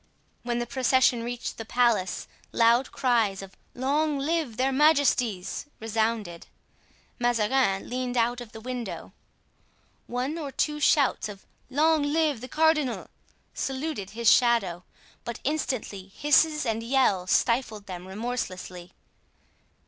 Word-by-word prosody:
When 240 -1 -2
the 240 - -1
procession 255 -1 +2
reached 240 0 -5
the - - -3
palace, 225 -5 +1 0.2
loud 235 +3 +3
cries 225 -7 +1
of 195 0 -12 0.2
"Long 290 +4 0
live 290 -4 -1
their 265 +1 +1
majesties!" 270 -9 +2
resounded. 220 -5 -2 0.7
Mazarin 240 -3 +1
leaned 250 0 -3
out 240 +1 +1
of 235 -2 -10
the 220 - -10
window. 245 -1 -6 0.9
One 255 +7 -3
or 290 -3 -5
two 300 +2 -1
shouts 280 -6 +2
of 200 -2 -11 0.2
"Long 310 +3 +3
live 290 -3 +1
the 255 - -6
cardinal" 305 -3 +1 0.4
saluted 270 -7 -3
his 235 -1 -1
shadow; 230 -8 +3 0.4
but 235 -1 -6
instantly 255 -9 -2
hisses 300 +7 +2
and 225 -1 -1
yells 230 -7 +1
stifled 230 -3 +1
them 180 -1 -8
remorselessly. 190 -4 -5
245 Hz, 120 wpm, -26 LUFS, 220-275 Hz, 0.9 s, loud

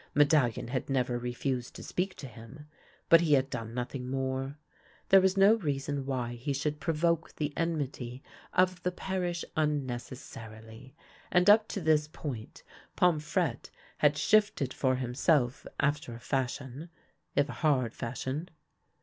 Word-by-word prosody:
Medallion 145 -6 +3
had 130 +1 -3
never 125 -2 0
re 125 0 -3
fused 125 0 -3
to - - -8
speak 185 +1 -2
to 145 - -9
him, 125 +4 -11 0.4
but 165 0 +7
he 160 -3 +3
had 135 0 +3
done 115 -3 -4
nothing 125 +1 -4
more. 135 +1 -2 0.5
There 195 0 +8
was 190 +1 +2
no 195 +2 +7
reason 140 -5 -2
why 125 -3 -2
he 120 +4 -3
should 150 +2 -2
provoke 165 +1 0
the 150 -1 -2
en 165 -1 0
mity 130 -2 -5 0.3
of 185 0 +2
the 180 - 0
parish 180 -2 -3
unnecessarily; 125 -4 -4 0.4
and 180 +1 +4
up 215 +1 +5
to 200 - -4
this 155 -2 +3
point 135 -7 -7 0.3
Pomfrette 155 -4 +1 0.3
had - - +4
shifted 210 - +2
for 130 -1 +1
himself 125 +1 +1
after 145 -4 0
a - - -9
fashion, 135 +4 -3 0.5
if 145 - +3
a - - -6
hard 130 -7 +2
fashion. 130 +7 -4
140 Hz, 150 wpm, -30 LUFS, 125-160 Hz, 0.5 s, There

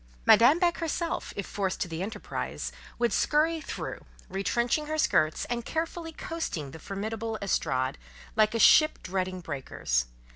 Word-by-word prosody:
Madame 250 +7 +7
Beck 345 -1 +2
herself, 330 +1 -2
if 200 - -3
forced 195 -2 -2
to - - -1
the 165 0 -5
enterprise, 210 +4 -4 0.3
would 235 -1 +2
"skurry" 315 +2 +2
through, - - -5 0.3
retrenching 235 +9 0
her 310 +1 -2
skirts, 155 - +2
and 240 -1 -3
carefully 325 +3 -3
coasting 315 - -4
the 160 - -10
formidable 220 +4 -4
estrade, 130 - 0 0.4
like 215 +1 +3
a - - +3
ship 310 +6 +7
dreading 185 0 -2
breakers. 130 - -2
225 Hz, 145 wpm, -28 LUFS, 185-310 Hz, 0.4 s, Madame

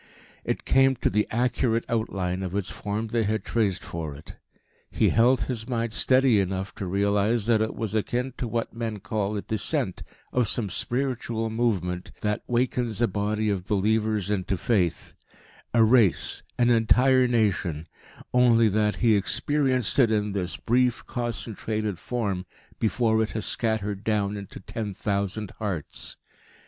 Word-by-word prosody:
It - - -3
came 135 0 +4
to - - 0
the 105 +2 +1
accurate 115 -1 0
out 115 -1 -1
line 90 -1 -2
of 95 0 -4
its 100 -2 -1
form 105 +2 -3
they 115 +1 +1
had 110 -1 -1
traced 105 -6 0
for 80 -4 -5
it. 75 - -12 0.5
He - - +2
held 120 +3 +4
his 120 -2 -4
mind 115 -2 -1
steady 130 -2 +4
enough 95 0 -2
to 95 - -4
realise 100 +3 +1
that 115 -2 +3
it 110 - -1
was 110 -3 -3
akin 120 +4 -1
to 125 - -2
what 115 0 -2
men 115 -2 -3
call 105 0 -2
a 100 - -4
"descent" 110 -3 -1 0.3
of 125 -3 +2
some 105 -3 -1
"spiritual 120 0 -2
movement" 95 -6 -1
that 105 0 -1
wakens 120 -2 0
a 120 - +3
body 105 +2 -1
of 95 -2 -3
believers 105 0 +1
into 95 -1 -1
faith 90 -5 0 0.6
a 115 -1 +5
race, 110 -5 +3 0.2
an 120 0 +4
entire 125 +3 +4
nation; 95 -9 0 0.5
only 120 -3 +5
that 105 +1 +1
he 110 -2 +6
experienced 130 +4 +1
it 120 -4 +6
in 105 -1 0
this 95 -3 -3
brief, 125 0 +1
concentrated 110 -4 -3
form 100 -7 -3 0.3
before 110 0 +2
it 110 - 0
has 110 -1 -1
scattered 105 -3 -1
down 105 -2 0
into 100 -1 -8
ten 105 +1 -5
thousand 100 0 -2
hearts. 95 -9 -4
110 Hz, 155 wpm, -26 LUFS, 100-120 Hz, 0.6 s, he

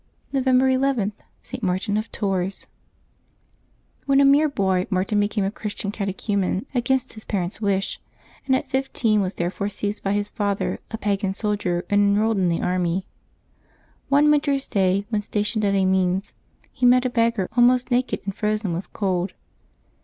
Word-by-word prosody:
November 260 -1 +3
ii.— 260 -5 +1 0.3
ST. - - -7
MARTIN 190 +2 -1
OF 215 +1 -2
TOURS. 195 -2 -2 1.4
^l^HEN 275 0 +5
a 280 - +6
mere 290 +3 +5
boy, 190 -7 0
Martin 195 +2 +1
became 205 0 0
a 195 - 0
Christian 205 -2 -4
catechu 200 0 -4
vl/ 200 - +2
men 190 +3 -1
against 255 +1 0
his 215 - -11
parents' 190 0 -3
wish; 195 -2 -1 0.5
and 265 - +4
at - - -2
fifteen 245 -5 +1
was 185 -1 -2
therefore 185 +4 -2
seized 205 +1 -3
by 195 - 0
his 205 0 0
father, 205 -1 -1
a 225 - -4
pagan 200 -2 -1
soldier, 200 -5 -1
and 205 0 +3
enrolled 205 +1 +2
in 180 -2 +2
the 170 - -1
army. 180 0 0 1.0
One 290 +2 +5
winter's 285 -2 +1
day, 195 0 +1
when 215 -3 0
stationed 210 +1 -1
at 200 -1 +2
Amiens, 190 0 +1 0.4
he 255 - -11
met 250 +1 +5
a - - +2
beggar 230 -5 +1
almost 245 +1 +4
naked 250 +1 0
and 195 - -3
frozen 210 -2 -1
with 175 +3 -5
cold. 185 -2 -1
205 Hz, 165 wpm, -23 LUFS, 190-245 Hz, 1.4 s, a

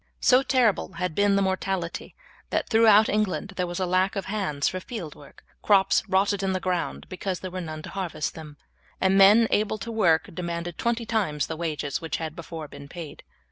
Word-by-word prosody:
So 255 +1 +5
terrible 255 -6 +1
had 180 0 -3
been 200 +2 +3
the 200 - +2
mortality 190 -2 -3 0.3
that - - -1
throughout 220 -2 +6
England 205 -1 -1
there 180 -1 -1
was 175 +1 -4
a 185 - +1
lack 185 +3 +1
of 195 - -3
hands 190 -9 -1
for 185 - -2
field 185 -6 -7
work, 145 - -17 0.2
crops 195 -2 +4
rotted 195 +1 +2
in 190 -1 0
the 185 - -1
ground 175 - -2
because 185 0 -4
there 185 - -6
were 185 0 -4
none 155 -2 -7
to - - -8
harvest 185 -6 -3
them, 150 -2 -10 0.4
and 190 0 +3
men 205 +4 +7
able 215 +1 +1
to 230 +3 -6
work 175 -8 +2
demanded 170 0 -5
twenty 235 0 0
times 195 -10 0
the 160 - -5
wages 155 -4 -3
which 165 - -3
had 160 -1 -5
before 165 -2 -7
been 140 - -11
paid. 160 -4 -9
185 Hz, 200 wpm, -25 LUFS, 165-205 Hz, 0.4 s, men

